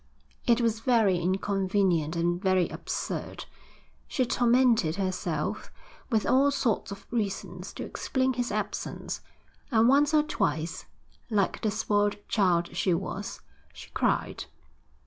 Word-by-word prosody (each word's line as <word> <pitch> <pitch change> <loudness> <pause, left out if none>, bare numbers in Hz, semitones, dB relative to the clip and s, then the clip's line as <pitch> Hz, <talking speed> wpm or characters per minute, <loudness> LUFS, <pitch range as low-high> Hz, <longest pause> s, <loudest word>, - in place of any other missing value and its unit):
It 240 0 +4
was 225 -2 +1
very 225 -7 +3
inconvenient 185 -3 +1
and 175 +1 0
very 185 -3 +3
absurd. - - -4 0.6
She 255 - 0
tormented 235 -8 +3
herself 185 -5 -2 0.4
with 220 -4 +1
all 275 +2 +4
sorts 260 -8 0
of 200 - -8
reasons 195 -5 -3
to - - -6
explain 260 -1 -1
his 245 -1 -2
absence, - - -4 0.5
and 230 -2 +4
once 285 +3 +5
or 300 - +5
twice, 160 - -2 0.4
like 205 -4 0
the 220 - +1
spoiled 205 -1 +1
child 175 -5 +1
she 180 0 +2
was, 195 +3 -5 0.3
she - - -12
cried. - - 0
205 Hz, 125 wpm, -28 LUFS, 180-240 Hz, 0.6 s, once